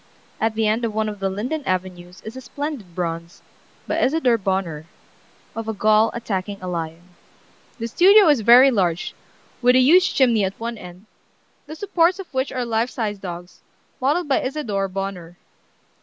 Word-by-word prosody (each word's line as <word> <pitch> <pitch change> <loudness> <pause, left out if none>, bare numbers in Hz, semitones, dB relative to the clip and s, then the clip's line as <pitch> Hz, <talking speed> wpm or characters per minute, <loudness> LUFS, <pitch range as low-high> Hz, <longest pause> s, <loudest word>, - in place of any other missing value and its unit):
At 220 0 0
the 220 0 0
end 220 +3 0
of 220 -2 -2
one 220 0 0
of 210 -1 -6
the 195 0 -1
linden 250 +11 -3
avenues 180 -1 -4
is 220 +3 -8
a 260 - -7
splendid 260 - -6
bronze, 170 -1 -5 0.4
by - - -1
Isadore 260 -5 +2
Bonheur, 190 -6 -2 0.7
of 225 -1 -5
a 220 - -3
Gaul 215 +2 +3
attacking 200 -3 -4
a 185 - -7
lion. 170 0 -5 0.7
"The 230 -1 -4
studio 390 - +6
is 290 -6 +4
very 245 +5 +7
large, 180 -6 -1 0.5
with 250 0 +4
a - - +6
huge 340 +9 +4
chimney 235 -6 +3
at 190 0 -3
one 235 +1 -4
end, 180 +3 -12 0.6
the 310 - -8
supports 360 -1 +1
of 390 -6 -10
which 260 +1 -1
are 250 -2 -3
life 230 +1 0
size 210 -5 -4
dogs, 175 -1 -8 0.4
modeled 300 +6 +1
by 275 - +2
Isadore 235 -8 -2
Bonheur. 185 -3 -6
220 Hz, 170 wpm, -21 LUFS, 185-260 Hz, 0.7 s, very